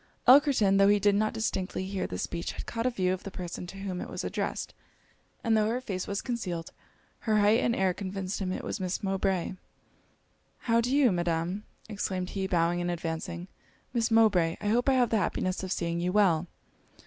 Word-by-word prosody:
Elkerton, 255 Hz, -8 st, +6 dB
tho' 195 Hz, -, +6 dB
he 205 Hz, 0 st, +5 dB
did 205 Hz, 0 st, +3 dB
not 215 Hz, +2 st, +2 dB
distinctly 190 Hz, -4 st, -2 dB
hear 190 Hz, -1 st, -3 dB
this 90 Hz, -, -4 dB
speech, 170 Hz, 0 st, -4 dB
had -, -, -7 dB
caught 230 Hz, +1 st, -2 dB
a -, -, +4 dB
view 185 Hz, -6 st, 0 dB
of 185 Hz, -, -4 dB
the -, -, -7 dB
person 180 Hz, -1 st, -6 dB
to 195 Hz, -, -9 dB
whom 195 Hz, -2 st, -4 dB
it -, -, -6 dB
was -, -, -5 dB
addressed; -, -, -3 dB, 0.7 s
and 225 Hz, -1 st, +3 dB
tho' 215 Hz, -1 st, +3 dB
her 235 Hz, +3 st, 0 dB
face 195 Hz, -7 st, -4 dB
was 200 Hz, 0 st, -3 dB
concealed, 185 Hz, -10 st, -3 dB, 0.5 s
her 215 Hz, -2 st, +1 dB
height 210 Hz, +3 st, +5 dB
and 240 Hz, -2 st, +1 dB
air 190 Hz, -1 st, +2 dB
convinced 190 Hz, 0 st, -4 dB
him 185 Hz, -1 st, -1 dB
it -, -, -4 dB
was -, -, -4 dB
Miss 185 Hz, +1 st, -3 dB
Mowbray. 190 Hz, -2 st, 0 dB, 1.1 s
'How 230 Hz, -1 st, +3 dB
do 245 Hz, +2 st, -1 dB
you, 275 Hz, -6 st, +5 dB
Madam?' 175 Hz, +3 st, -1 dB, 0.2 s
exclaimed 190 Hz, -4 st, -3 dB
he, 190 Hz, -1 st, -2 dB
bowing 175 Hz, -1 st, +1 dB
and 175 Hz, -, -1 dB
advancing 170 Hz, +1 st, -4 dB, 0.5 s
'Miss 235 Hz, -1 st, +1 dB
Mowbray, 210 Hz, -8 st, +4 dB
I 205 Hz, -, -2 dB
hope 245 Hz, +5 st, +2 dB
I -, -, +4 dB
have 250 Hz, -3 st, +3 dB
the 225 Hz, -, +3 dB
happiness 185 Hz, -2 st, -1 dB
of 190 Hz, -1 st, -5 dB
seeing 170 Hz, -2 st, -1 dB
you 180 Hz, +1 st, 0 dB
well.' 180 Hz, -5 st, +3 dB
195 Hz, 205 wpm, -29 LUFS, 180-220 Hz, 1.1 s, Elkerton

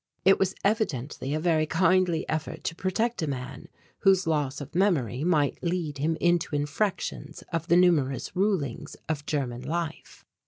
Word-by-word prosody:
It 195 Hz, +1 st, +6 dB
was 190 Hz, -1 st, +1 dB
evidently 150 Hz, -, -1 dB
a -, -, 0 dB
very 160 Hz, -2 st, +2 dB
kindly 175 Hz, 0 st, +2 dB
effort 160 Hz, -1 st, -3 dB
to -, -, -2 dB
protect 220 Hz, +6 st, -1 dB
a 160 Hz, -, -1 dB
man 130 Hz, 0 st, -6 dB, 0.3 s
whose 190 Hz, -2 st, +4 dB
loss 150 Hz, -4 st, 0 dB
of 145 Hz, -1 st, -8 dB
memory 155 Hz, -, +1 dB
might 155 Hz, -5 st, +1 dB
lead 170 Hz, -5 st, -2 dB
him 160 Hz, +3 st, 0 dB
into 175 Hz, -3 st, +1 dB
infractions 150 Hz, 0 st, -2 dB
of 165 Hz, 0 st, -2 dB
the 175 Hz, -, +5 dB
numerous 155 Hz, -6 st, +2 dB
rulings 180 Hz, -, -1 dB
of 150 Hz, -2 st, -3 dB
German 125 Hz, -5 st, -2 dB
life. 165 Hz, +4 st, -5 dB
160 Hz, 155 wpm, -27 LUFS, 145-180 Hz, 0.3 s, It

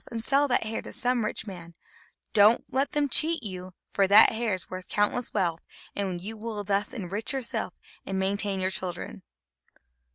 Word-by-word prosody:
And 225 Hz, -1 st, -5 dB
sell 280 Hz, +1 st, +4 dB
that 250 Hz, -, +2 dB
hair 220 Hz, 0 st, -3 dB
to -, -, -9 dB
some 245 Hz, -1 st, 0 dB
rich 215 Hz, -, -3 dB
man; 175 Hz, -4 st, -9 dB
but -, -, -30 dB
don't 215 Hz, +2 st, +4 dB
let 270 Hz, +2 st, 0 dB
them 295 Hz, -1 st, +2 dB
cheat 315 Hz, +2 st, +3 dB
you, 185 Hz, -3 st, -7 dB, 0.2 s
for 195 Hz, -1 st, +3 dB
that 205 Hz, +3 st, +8 dB
hair 225 Hz, -3 st, -1 dB
is 185 Hz, -, -6 dB
worth 185 Hz, 0 st, -7 dB
countless 215 Hz, +4 st, 0 dB
wealth; 170 Hz, -5 st, 0 dB, 0.3 s
and 190 Hz, -3 st, -2 dB
you 210 Hz, +5 st, -6 dB
will 215 Hz, -1 st, -5 dB
thus 200 Hz, +1 st, 0 dB
enrich 205 Hz, +4 st, -4 dB
yourself 265 Hz, -3 st, -1 dB, 0.3 s
and 195 Hz, -, -3 dB
maintain 195 Hz, +1 st, 0 dB
your 185 Hz, 0 st, +1 dB
children." 185 Hz, -1 st, -4 dB
205 Hz, 185 wpm, -27 LUFS, 190-235 Hz, 0.3 s, that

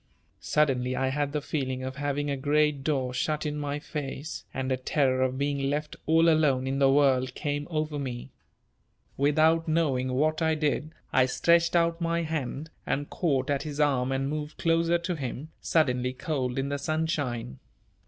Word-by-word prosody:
Suddenly 130 Hz, -4 st, +1 dB
I 130 Hz, 0 st, 0 dB
had 145 Hz, +1 st, -1 dB
the 150 Hz, -1 st, -2 dB
feeling 130 Hz, -4 st, -2 dB
of 130 Hz, +2 st, -5 dB
having 145 Hz, 0 st, -1 dB
a -, -, 0 dB
great 145 Hz, +1 st, +1 dB
door 135 Hz, -4 st, 0 dB
shut 150 Hz, +5 st, -1 dB
in 150 Hz, 0 st, -2 dB
my 145 Hz, 0 st, -2 dB
face, 150 Hz, 0 st, -6 dB
and 130 Hz, 0 st, -3 dB
a -, -, +3 dB
terror 130 Hz, 0 st, +1 dB
of 130 Hz, 0 st, 0 dB
being 140 Hz, -1 st, 0 dB
left 150 Hz, +1 st, -2 dB
all 165 Hz, +1 st, +5 dB
alone 150 Hz, -5 st, +3 dB
in 135 Hz, +1 st, -1 dB
the 135 Hz, -1 st, +5 dB
world 130 Hz, -2 st, +3 dB
came 145 Hz, 0 st, -2 dB
over 155 Hz, -2 st, -2 dB
me. 125 Hz, -3 st, -5 dB, 0.8 s
Without 155 Hz, +3 st, +3 dB
knowing 140 Hz, -6 st, +1 dB
what 155 Hz, +4 st, +1 dB
I 160 Hz, -1 st, +2 dB
did 155 Hz, 0 st, 0 dB, 0.2 s
I 130 Hz, -1 st, +5 dB
stretched 170 Hz, +6 st, +3 dB
out 170 Hz, 0 st, +2 dB
my 170 Hz, 0 st, 0 dB
hand 155 Hz, -1 st, -4 dB
and 145 Hz, +1 st, -2 dB
caught 140 Hz, -5 st, 0 dB
at 140 Hz, -1 st, 0 dB
his 150 Hz, -1 st, -6 dB
arm 135 Hz, -3 st, +2 dB
and 135 Hz, 0 st, 0 dB
moved 150 Hz, +1 st, -4 dB
closer 165 Hz, +1 st, +2 dB
to 170 Hz, +1 st, -3 dB
him, 140 Hz, +1 st, -5 dB
suddenly 125 Hz, -5 st, +1 dB
cold 130 Hz, -4 st, -2 dB
in 135 Hz, +1 st, -1 dB
the 145 Hz, 0 st, -2 dB
sunshine. 145 Hz, -, -2 dB
145 Hz, 175 wpm, -28 LUFS, 130-155 Hz, 0.8 s, all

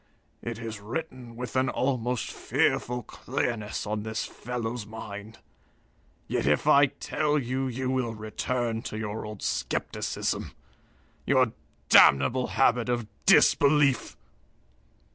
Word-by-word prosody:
It 115 Hz, -1 st, -5 dB
is 115 Hz, -2 st, -6 dB
written 125 Hz, +1 st, -6 dB
with 125 Hz, +1 st, -6 dB
an 130 Hz, +1 st, +2 dB
almost 125 Hz, -2 st, -1 dB
fearful 125 Hz, 0 st, 0 dB
clearness 110 Hz, -1 st, -3 dB
on 105 Hz, 0 st, -2 dB
this 110 Hz, +1 st, -3 dB
fellow's 120 Hz, -1 st, -4 dB
mind. 105 Hz, 0 st, -9 dB, 0.9 s
Yet -, -, -1 dB
if 75 Hz, -, +2 dB
I 145 Hz, -1 st, +6 dB
tell 150 Hz, +2 st, -1 dB
you, 130 Hz, 0 st, -1 dB
you 130 Hz, +1 st, -2 dB
will 125 Hz, -3 st, -1 dB
return 115 Hz, +2 st, -2 dB
to 110 Hz, -, -6 dB
your 110 Hz, 0 st, -4 dB
old 105 Hz, -2 st, -8 dB
skepticism -, -, -2 dB, 0.7 s
your 130 Hz, -4 st, +3 dB, 0.4 s
damnable 70 Hz, -, +6 dB
habit 125 Hz, -2 st, +2 dB
of 120 Hz, -2 st, 0 dB, 0.2 s
disbelief!" 140 Hz, -2 st, +4 dB
120 Hz, 115 wpm, -27 LUFS, 110-130 Hz, 0.9 s, I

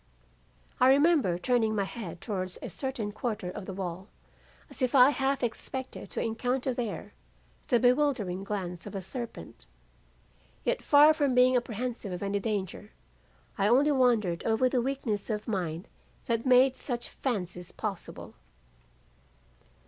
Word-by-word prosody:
I 255 Hz, -, +6 dB
remember 275 Hz, -, +4 dB
turning 225 Hz, +2 st, +1 dB
my 200 Hz, -, +1 dB
head 190 Hz, -5 st, -7 dB
towards 185 Hz, -4 st, -4 dB
a -, -, -5 dB
certain 260 Hz, -6 st, -3 dB
quarter 215 Hz, -4 st, -3 dB
of 200 Hz, 0 st, -8 dB
the 195 Hz, -, -5 dB
wall 185 Hz, 0 st, -5 dB, 0.6 s
as -, -, -10 dB
if 255 Hz, +1 st, +1 dB
I 260 Hz, +1 st, +8 dB
half 275 Hz, -2 st, 0 dB
expected 260 Hz, +2 st, -4 dB
to -, -, -4 dB
encounter 245 Hz, +3 st, -1 dB
there 240 Hz, -3 st, -4 dB, 0.5 s
the 240 Hz, -, +3 dB
bewildering 245 Hz, -8 st, +2 dB
glance 185 Hz, -3 st, -4 dB
of 205 Hz, -, -8 dB
a 195 Hz, -, -3 dB
serpent. 190 Hz, -, -7 dB, 1.0 s
Yet -, -, 0 dB
far 295 Hz, +2 st, +7 dB
from 285 Hz, -5 st, +1 dB
being 250 Hz, +1 st, +5 dB
apprehensive 240 Hz, -3 st, -2 dB
of 180 Hz, +1 st, -4 dB
any 200 Hz, 0 st, 0 dB
danger, 205 Hz, -1 st, -3 dB, 0.7 s
I 200 Hz, -, +3 dB
only 270 Hz, +7 st, +4 dB
wondered 235 Hz, -10 st, +2 dB
over 225 Hz, +3 st, +2 dB
the 250 Hz, -1 st, +1 dB
weakness 235 Hz, -6 st, -2 dB
of 210 Hz, -1 st, -3 dB
mind 180 Hz, -5 st, -3 dB, 0.4 s
that 230 Hz, 0 st, -1 dB
made 255 Hz, +1 st, +6 dB
such 245 Hz, -2 st, -4 dB
fancies 180 Hz, -8 st, -4 dB
possible. 205 Hz, -5 st, -6 dB
230 Hz, 140 wpm, -29 LUFS, 195-255 Hz, 1.0 s, I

